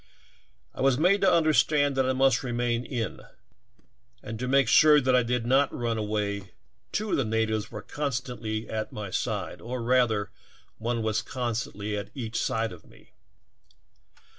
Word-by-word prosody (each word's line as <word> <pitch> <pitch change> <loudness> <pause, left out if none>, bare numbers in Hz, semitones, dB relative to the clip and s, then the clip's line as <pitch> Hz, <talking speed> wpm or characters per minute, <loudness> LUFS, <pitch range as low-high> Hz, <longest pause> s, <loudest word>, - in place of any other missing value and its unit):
I - - -7
was 135 -1 +3
made 185 +6 +3
to 190 -2 +5
understand 150 -3 +3
that 130 -1 +1
I - - +2
must 130 -3 +3
remain 120 -1 -1
in 120 -5 -3
the - - -14
council - - -16
hall, - - -28 0.4
and 110 0 -5
to 125 - -2
make 135 +1 +3
sure 150 -1 +7
that 130 -2 +2
I 125 - +5
did 120 0 -1
not 135 +3 +3
run 115 -2 -2
away 105 -2 -3 0.4
two 215 -1 -2
of - - +2
the 135 - +2
natives 110 -1 -1
were 105 -3 -7
constantly 125 -6 -3
at 110 -1 -4
my 105 -3 -6
side, - - -3
or 125 +2 -5
rather, 115 -4 +2 0.5
one 115 0 -1
was 110 0 0
constantly 110 -4 -3
at 100 0 -5
each 115 -4 -3
side 115 -4 -1
of 90 -3 -12
me. - - -20
120 Hz, 175 wpm, -27 LUFS, 110-135 Hz, 0.5 s, sure